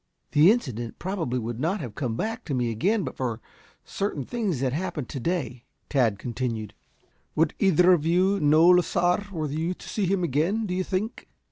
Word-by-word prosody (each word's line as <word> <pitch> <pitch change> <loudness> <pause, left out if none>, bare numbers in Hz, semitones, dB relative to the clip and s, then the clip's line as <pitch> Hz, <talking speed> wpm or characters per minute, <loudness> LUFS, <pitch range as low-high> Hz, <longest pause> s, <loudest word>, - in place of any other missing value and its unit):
"The 150 +5 +6
incident 125 - -1
probably 170 -9 -2
would 115 0 -4
not 170 +9 0
have 125 - -6
come 120 -1 -3
back 225 - -3
to 140 - -2
me 120 -2 0
again 195 - +1
but 130 - -5
for 120 -4 -3 0.5
certain 175 -9 -3
things 210 - -2
that 130 -1 0
happened 155 -5 -3
to 135 - -5
day," 125 -6 -3 0.2
Tad 120 -8 +2
continued. 115 -2 -4 0.6
"Would 160 0 +2
either 185 -2 +5
of 165 -4 +1
you 185 +5 +2
know 155 +2 +5
Lasar 180 +2 +3
were 160 -4 -3
you 160 +5 -2
to - - -13
see 205 -4 -1
him 190 0 +1
again, 170 - +1
do 180 - -3
you 185 +1 0
think?" 200 +6 -3
160 Hz, 190 wpm, -26 LUFS, 125-185 Hz, 0.6 s, The